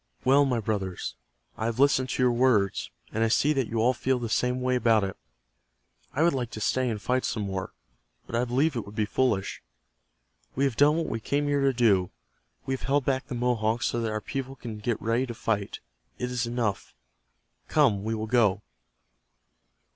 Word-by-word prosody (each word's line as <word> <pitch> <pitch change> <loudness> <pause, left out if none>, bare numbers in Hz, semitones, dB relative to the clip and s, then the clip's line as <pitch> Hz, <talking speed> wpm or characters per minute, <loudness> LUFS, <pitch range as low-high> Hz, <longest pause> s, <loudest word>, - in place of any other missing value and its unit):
"Well, 140 +2 +5
my 125 -3 0
brothers, 100 -4 -3 0.4
I 110 - -2
have 115 0 -1
listened 135 -1 +3
to 125 - 0
your 125 - +4
words, 120 -5 +2 0.2
and 110 - 0
I - - +3
see 145 +6 +3
that 135 -5 0
you 115 - -4
all 120 +3 +3
feel 130 +1 0
the 120 -2 -4
same 125 +2 +1
way 130 0 0
about 115 -3 +3
it. 95 -1 -3 1.0
I 150 - +1
would 170 - +4
like 125 -3 -2
to - - -4
stay 130 +4 +1
and 110 -2 -3
fight 125 +4 0
some 110 - -2
more, 95 -1 -4 0.5
but - - -6
I 120 - +2
believe 135 +5 +1
it 115 - -2
would 100 - -12
be 110 - +1
foolish. 105 -3 0 0.9
We 135 - +1
have 135 -4 +1
done 145 +4 +5
what 165 0 0
we 115 - -3
came 145 +6 -1
here 145 -1 +1
to 135 0 +4
do. 105 -8 +3 0.6
We - - -1
have 130 - -4
held 140 -1 +2
back 130 -1 0
the 130 - -5
Mohawks 120 -2 0
so 120 - 0
that 115 - -1
our 110 0 -2
people 135 +3 -5
can 115 -5 -7
get 110 +1 -1
ready 115 +3 0
to 120 - -6
fight 105 -3 -2 0.4
It 125 0 -3
is 120 -1 -1
enough. 115 -4 -2 0.7
Come, 100 -1 +3
we 110 +1 -1
will 110 0 -3
go." 110 -4 +2
120 Hz, 205 wpm, -27 LUFS, 110-130 Hz, 1.0 s, Well